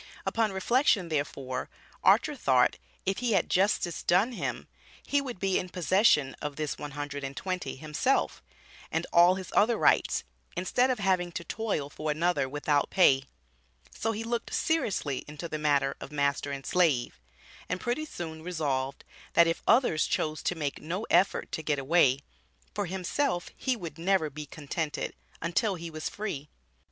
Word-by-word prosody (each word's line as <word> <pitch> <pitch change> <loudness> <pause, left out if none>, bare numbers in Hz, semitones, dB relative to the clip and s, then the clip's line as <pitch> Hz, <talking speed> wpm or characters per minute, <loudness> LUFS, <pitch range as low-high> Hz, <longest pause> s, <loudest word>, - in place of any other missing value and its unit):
Upon 225 -2 +1
reflection, 200 - +2
therefore, 140 -4 -3 0.3
Archer - - +4
thought, - - +3 0.3
if 195 +1 0
he 245 -3 +1
had 190 - +1
justice 185 -2 +1
done 190 +8 +3
him, 240 - -4 0.4
he 285 0 +2
would 255 -5 -6
be 195 -1 +1
in 180 - -5
possession 180 -6 +3
of 145 -1 -4
this 155 -1 -3
"one 145 -1 -6
hundred 145 -1 -4
and 135 0 -5
twenty" 185 -1 -3
himself, 155 - 0 0.5
and - - 0
all 175 +2 +7
his 190 -1 -7
other 225 +3 +4
rights, - - +3 0.3
instead 245 +8 +2
of 255 - +1
having 185 -4 +1
to 170 - -4
toil 200 -5 -2
for 155 +2 -5
another 155 -2 +1
without 145 0 +1
pay; 135 -8 +4 0.7
so 225 - -1
he 225 0 -4
looked 235 +1 -3
seriously 205 - 0
into 150 +3 -6
the 155 -2 -4
matter 140 -2 +2
of - - -8
master 140 -1 0
and 140 -1 -5
slave, 150 - +1 0.5
and 180 - -1
pretty 245 +9 -2
soon 160 - -7
resolved, 145 -6 -2 0.3
that 170 - +7
if 165 0 -1
others 225 -9 +4
chose 155 0 -1
to 180 - -1
make 145 -4 -3
no 180 +8 -3
effort 180 +3 +3
to - - -3
get 150 -2 0
away, 140 -1 +3 0.5
for 205 -2 -2
himself 185 - -1
he 260 -2 0
would 170 -7 -8
never 170 -3 +2
be 150 +1 -7
contented, 150 +1 -4 0.3
until 190 +5 +1
he 170 -1 -7
was 155 0 -4
free. 150 -9 -5
170 Hz, 165 wpm, -29 LUFS, 145-195 Hz, 0.7 s, all